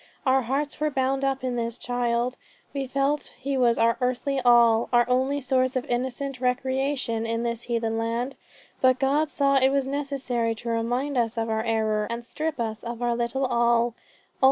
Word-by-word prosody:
Our 265 Hz, 0 st, +4 dB
hearts 275 Hz, +4 st, -2 dB
were 305 Hz, 0 st, +1 dB
bound 270 Hz, -1 st, 0 dB
up 270 Hz, -1 st, 0 dB
in 250 Hz, -1 st, -1 dB
this 230 Hz, 0 st, -2 dB
child; 245 Hz, 0 st, -1 dB, 0.4 s
we 275 Hz, -2 st, -3 dB
felt 275 Hz, +3 st, -1 dB
he 275 Hz, +1 st, -3 dB
was 240 Hz, -3 st, +3 dB
our 230 Hz, +1 st, +3 dB
earthly 255 Hz, +2 st, 0 dB
all, 235 Hz, -2 st, +5 dB
our 240 Hz, -1 st, +4 dB
only 260 Hz, +3 st, +1 dB
source 255 Hz, 0 st, +1 dB
of 255 Hz, -, -1 dB
innocent 260 Hz, +2 st, -3 dB
recreation 260 Hz, -2 st, 0 dB
in 230 Hz, +1 st, -1 dB
this 235 Hz, -1 st, -2 dB
heathen 230 Hz, -2 st, -1 dB
land. 235 Hz, +4 st, -2 dB, 0.5 s
But 255 Hz, -1 st, +5 dB
God 285 Hz, +3 st, +1 dB
saw 275 Hz, -2 st, +2 dB
it 265 Hz, 0 st, +4 dB
was 275 Hz, -1 st, +1 dB
necessary 270 Hz, -5 st, -2 dB
to 235 Hz, +2 st, -6 dB
remind 245 Hz, +4 st, 0 dB
us 230 Hz, -1 st, -1 dB
of 225 Hz, 0 st, -1 dB
our 220 Hz, 0 st, 0 dB
error 220 Hz, -2 st, 0 dB
and 235 Hz, 0 st, -4 dB
strip 310 Hz, +2 st, -3 dB
us 220 Hz, -1 st, -3 dB
of 235 Hz, 0 st, -5 dB
our 240 Hz, -1 st, +1 dB
little 240 Hz, +3 st, -1 dB
all. 235 Hz, -1 st, +2 dB
250 Hz, 180 wpm, -25 LUFS, 235-270 Hz, 0.5 s, all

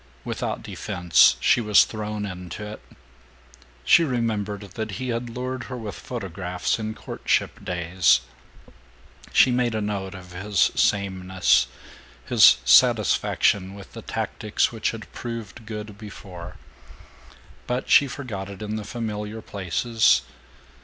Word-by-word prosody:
Without -, -, -3 dB
defense, 90 Hz, -1 st, +3 dB
she 120 Hz, -, +3 dB
was 105 Hz, -3 st, +6 dB
thrown 105 Hz, -1 st, -4 dB
into 90 Hz, +1 st, -7 dB
it. 105 Hz, +1 st, -8 dB, 1.0 s
She 170 Hz, -, +6 dB
remembered 110 Hz, -7 st, -1 dB
that 110 Hz, +1 st, -5 dB
he 130 Hz, +5 st, -4 dB
had 120 Hz, 0 st, -2 dB
lured 125 Hz, +1 st, -4 dB
her 125 Hz, -, -6 dB
with 110 Hz, -4 st, -6 dB
photographs 95 Hz, -5 st, -3 dB
in 110 Hz, 0 st, -4 dB
courtship -, -, -2 dB
days; 90 Hz, -6 st, +2 dB, 1.1 s
she 130 Hz, -, +5 dB
made 120 Hz, -2 st, +1 dB
a -, -, 0 dB
note 100 Hz, -2 st, -3 dB
of 90 Hz, -1 st, -11 dB
his 95 Hz, +1 st, +1 dB
sameness, 95 Hz, -2 st, +2 dB, 0.6 s
his -, -, +7 dB
satisfaction 95 Hz, -1 st, +3 dB
with 100 Hz, -1 st, -12 dB
the -, -, -8 dB
tactics -, -, -1 dB
which -, -, -1 dB
had -, -, -8 dB
proved 115 Hz, -1 st, -7 dB
good 105 Hz, -1 st, -7 dB
before; 95 Hz, -5 st, -10 dB, 1.1 s
but 125 Hz, +1 st, -2 dB
she 145 Hz, -, +6 dB
forgot 110 Hz, -8 st, -6 dB
it 100 Hz, +1 st, -8 dB
in 105 Hz, +1 st, -3 dB
the 110 Hz, -, -5 dB
familiar 105 Hz, -1 st, -5 dB
places. 110 Hz, +3 st, +1 dB
105 Hz, 125 wpm, -24 LUFS, 95-115 Hz, 1.1 s, his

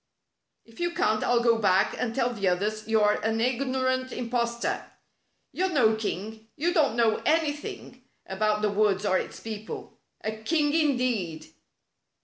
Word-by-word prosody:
" -, -, -54 dB
If 230 Hz, 0 st, -18 dB
you 345 Hz, -1 st, -1 dB
can't 215 Hz, 0 st, +1 dB
I'll 240 Hz, -1 st, +2 dB
go 230 Hz, -1 st, +4 dB
back 190 Hz, -3 st, +3 dB
and 230 Hz, -2 st, -3 dB
tell 245 Hz, -2 st, +2 dB
all -, -, -5 dB
the 200 Hz, -4 st, -1 dB
others 210 Hz, +4 st, -1 dB
you're 215 Hz, -2 st, +3 dB
an 220 Hz, +1 st, 0 dB
ignorant 260 Hz, +1 st, 0 dB
impos 235 Hz, -1 st, -2 dB
tor. -, -, -1 dB, 0.7 s
You're 375 Hz, +1 st, 0 dB
no 240 Hz, -10 st, +3 dB
king! 220 Hz, +1 st, -5 dB
You 345 Hz, +4 st, 0 dB
don't 290 Hz, -, +2 dB
know 230 Hz, -2 st, +2 dB
anything 295 Hz, -5 st, -1 dB, 0.2 s
about 210 Hz, +2 st, 0 dB
the 210 Hz, -, +2 dB
woods 205 Hz, -1 st, +2 dB
or 190 Hz, -2 st, +3 dB
its -, -, -7 dB
people. 220 Hz, -1 st, -7 dB, 0.2 s
A 215 Hz, -, -2 dB
king 295 Hz, +6 st, +1 dB
indeed!" 250 Hz, -, 0 dB
230 Hz, 160 wpm, -27 LUFS, 215-260 Hz, 0.7 s, go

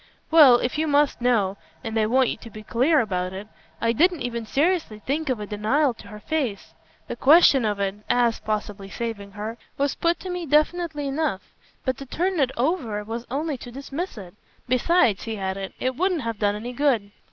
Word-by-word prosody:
"Well, 300 Hz, -6 st, +8 dB
if 245 Hz, +4 st, -1 dB
you 315 Hz, -, +1 dB
must 290 Hz, -3 st, +2 dB
know 210 Hz, -6 st, +2 dB, 0.3 s
and 225 Hz, -1 st, -4 dB
I 215 Hz, -, +2 dB
want 255 Hz, +2 st, +3 dB
you -, -, -3 dB
to 230 Hz, -, -11 dB
be 215 Hz, 0 st, -10 dB
clear 270 Hz, +8 st, +3 dB
about 185 Hz, -4 st, -2 dB
it 195 Hz, +2 st, -7 dB, 0.3 s
I 230 Hz, 0 st, +1 dB
didn't 350 Hz, +6 st, +2 dB
even 235 Hz, -2 st, -4 dB
seriously 310 Hz, -, 0 dB
think 280 Hz, +8 st, -2 dB
of 250 Hz, -4 st, 0 dB
a 210 Hz, -, -4 dB
denial 225 Hz, +7 st, +1 dB
to -, -, -14 dB
her 210 Hz, -, -10 dB
face. 255 Hz, -6 st, -3 dB, 0.3 s
The -, -, -4 dB
question 280 Hz, -4 st, +6 dB
of 205 Hz, -1 st, -1 dB
it 195 Hz, 0 st, -1 dB
AS 240 Hz, -2 st, +2 dB
possibly 210 Hz, -2 st, -4 dB
saving 205 Hz, -3 st, -5 dB
her 220 Hz, +3 st, -6 dB, 0.2 s
was 280 Hz, 0 st, +1 dB
put 340 Hz, +1 st, 0 dB
to 370 Hz, -, -5 dB
me 355 Hz, -2 st, -4 dB
definitely 300 Hz, 0 st, +1 dB
enough; 275 Hz, -8 st, -2 dB, 0.3 s
but 260 Hz, -2 st, 0 dB
to 275 Hz, -, -9 dB
turn 360 Hz, +5 st, -1 dB
it 270 Hz, -3 st, +3 dB
over 240 Hz, -, -1 dB
was 230 Hz, +3 st, -6 dB
only 285 Hz, +1 st, -2 dB
to 245 Hz, -, -9 dB
dismiss 275 Hz, +6 st, -6 dB
it. 185 Hz, -4 st, -9 dB, 0.3 s
Besides," 255 Hz, -, +3 dB
he 225 Hz, -1 st, -4 dB
added, 190 Hz, 0 st, -4 dB
"it 255 Hz, 0 st, -1 dB
wouldn't 360 Hz, +1 st, 0 dB
have 230 Hz, -2 st, -4 dB
done 205 Hz, -1 st, +1 dB
any 235 Hz, +4 st, -6 dB
good." 240 Hz, -7 st, +1 dB
245 Hz, 200 wpm, -24 LUFS, 215-295 Hz, 0.3 s, Well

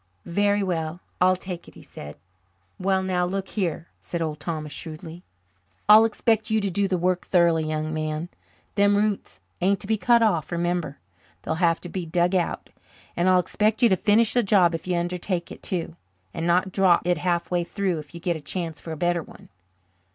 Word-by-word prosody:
"Very 205 Hz, +3 st, +1 dB
well, 165 Hz, -2 st, -2 dB, 0.2 s
I'll 185 Hz, +1 st, +5 dB
take 180 Hz, -1 st, -7 dB
it," -, -, -15 dB
he -, -, -13 dB
said. 75 Hz, 0 st, -9 dB, 0.6 s
"Well, 190 Hz, 0 st, +1 dB
now, 185 Hz, -1 st, 0 dB
look 190 Hz, +2 st, -2 dB
here," 170 Hz, -5 st, -2 dB
said 170 Hz, -, -5 dB
Old 155 Hz, -2 st, -3 dB
Thomas 155 Hz, -1 st, -4 dB
shrewdly, 160 Hz, +1 st, -8 dB, 0.7 s
"I'll 215 Hz, +2 st, +9 dB
expect 220 Hz, 0 st, +1 dB
you 220 Hz, 0 st, +2 dB
to 200 Hz, -2 st, -2 dB
do 200 Hz, +2 st, +1 dB
the 185 Hz, -1 st, 0 dB
work 180 Hz, +1 st, 0 dB
thoroughly, 170 Hz, -3 st, +3 dB
young 155 Hz, 0 st, -2 dB
man. 155 Hz, +2 st, -3 dB, 0.4 s
Them 200 Hz, 0 st, +3 dB
roots 210 Hz, -1 st, -1 dB, 0.2 s
ain't 195 Hz, +2 st, +2 dB
to -, -, -5 dB
be 220 Hz, +2 st, +1 dB
cut 235 Hz, +1 st, +4 dB
off, 175 Hz, -9 st, +1 dB
remember; 175 Hz, -4 st, -1 dB, 0.5 s
they'll -, -, -1 dB
have 165 Hz, -1 st, +3 dB
to -, -, -7 dB
be 180 Hz, -1 st, -4 dB
dug 175 Hz, +2 st, +1 dB
out. 180 Hz, -2 st, -1 dB, 0.4 s
And 175 Hz, +2 st, +2 dB
I'll 185 Hz, -, +5 dB
expect 215 Hz, +5 st, 0 dB
you 235 Hz, -, +7 dB
to 190 Hz, -, +4 dB
finish 215 Hz, +4 st, +3 dB
the 245 Hz, -, +4 dB
job 190 Hz, -5 st, +4 dB
if 165 Hz, -, -5 dB
you 180 Hz, -1 st, +1 dB
undertake 175 Hz, +1 st, -2 dB
it -, -, -10 dB
too, 170 Hz, -3 st, -3 dB, 0.4 s
and 165 Hz, +1 st, -2 dB
not 180 Hz, +2 st, +2 dB
drop 185 Hz, -3 st, +3 dB
it 175 Hz, -2 st, +1 dB
halfway 175 Hz, +1 st, 0 dB
through 185 Hz, -2 st, -2 dB
if 150 Hz, +2 st, -11 dB
you -, -, -6 dB
get 170 Hz, 0 st, -1 dB
a 160 Hz, -, -7 dB
chance 165 Hz, -1 st, -4 dB
for 165 Hz, -, -7 dB
a 160 Hz, -, -5 dB
better 175 Hz, +1 st, +1 dB
one." -, -, -15 dB
180 Hz, 200 wpm, -25 LUFS, 165-195 Hz, 0.7 s, I'll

